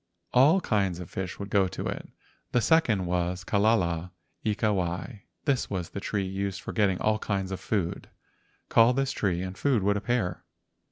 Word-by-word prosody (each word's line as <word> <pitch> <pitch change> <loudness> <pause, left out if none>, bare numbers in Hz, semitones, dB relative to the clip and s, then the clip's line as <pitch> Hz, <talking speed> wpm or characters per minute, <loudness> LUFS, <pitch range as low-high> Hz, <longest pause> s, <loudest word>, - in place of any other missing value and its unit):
All 150 +9 +6
kinds 100 - 0
of 90 - -8
fish 95 0 -4
would 100 -1 -7
go 100 -2 +4
to - - -5
it. - - -4 0.4
The 125 - +4
second 115 - +3
was 90 +1 -1
"Kalala 95 -5 +1 0.3
ika 105 0 +1
wai." 95 +4 -3 0.2
This 140 -4 +1
was 90 -3 -3
the - - -4
tree 100 0 -2
used 95 +1 -3
for - - -6
getting 100 -4 +2
all 110 0 +1
kinds 95 -3 -2
of 95 - -3
food. 95 -6 -2 0.6
Call 115 +2 +5
this 135 +1 0
tree 90 -3 -1
and 95 0 -5
food 125 -6 +1
would 100 +1 +2
appear. 100 -6 -1
100 Hz, 175 wpm, -28 LUFS, 90-110 Hz, 0.6 s, All